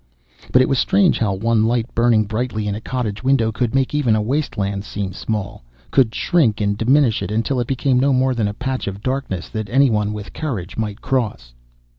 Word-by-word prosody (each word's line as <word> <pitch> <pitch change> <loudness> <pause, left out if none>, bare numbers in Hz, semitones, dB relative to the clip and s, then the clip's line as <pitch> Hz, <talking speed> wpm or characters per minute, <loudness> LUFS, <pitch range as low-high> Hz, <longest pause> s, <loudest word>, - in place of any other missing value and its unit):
But 130 - +6
it - - 0
was 135 -2 +1
strange 195 -2 +3
how 105 -4 +1
one 110 +2 +1
light 120 0 -1
burning 115 -2 +3
brightly 110 0 -2
in 100 - -1
a 105 - -5
cottage 115 -3 -3
window 130 -4 +2
could 120 +2 -1
make 135 0 +1
even 135 -7 +2
a - - +1
wasteland 105 -7 -2
seem 100 -2 -4
small, 105 - -4 0.3
could 125 -5 +3
shrink 145 - +2
and 100 -1 0
diminish 125 +2 +2
it - - -3
until 115 +5 0
it 120 - -1
became 130 -1 +1
no 140 +2 +3
more 130 0 +2
than 115 -4 0
a 105 - -3
patch 130 0 -3
of 100 +1 -5
darkness 130 -9 -3
that 110 -2 -5
anyone 110 -5 +2
with 105 -1 -7
courage 110 - -4
might 105 -1 -4
cross. 105 - -2
115 Hz, 205 wpm, -20 LUFS, 105-130 Hz, 0.3 s, But